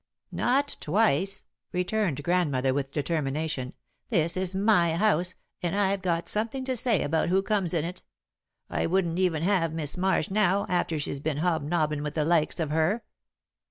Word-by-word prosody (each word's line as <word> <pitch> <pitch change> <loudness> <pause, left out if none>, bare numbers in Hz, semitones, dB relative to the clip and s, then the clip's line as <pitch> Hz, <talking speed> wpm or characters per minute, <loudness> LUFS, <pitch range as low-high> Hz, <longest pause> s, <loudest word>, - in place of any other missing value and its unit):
"Not 275 +4 +1
twice," 195 +1 +1 0.3
returned 180 -5 -1
Grandmother, 145 -7 +1
with 135 0 -2
determination. 145 -3 -2 0.4
"This 170 -5 +2
is 185 0 -2
my 190 -5 +3
house, 180 -2 +2 0.3
and 175 +1 -1
I've 200 -1 +1
got 170 -2 -1
something 230 +5 -1
to 260 -1 -1
say 235 -5 +2
about 160 +3 0
who 190 +2 +2
comes 200 -5 0
in 165 -3 0
it. 180 +2 -6 0.7
I - - -1
wouldn't 175 -1 0
even 170 -4 +1
have 175 -4 +1
Mis' 155 0 -3
Marsh 185 -2 +1
now, 200 -1 +2
after 175 -2 0
she's 140 -1 -3
been 150 0 -2
hobnobbin' 155 -2 0
with 150 0 -4
the 155 -2 +1
likes 165 -1 +1
of 155 -3 -1
her." 160 +9 +1
175 Hz, 160 wpm, -27 LUFS, 155-195 Hz, 0.7 s, my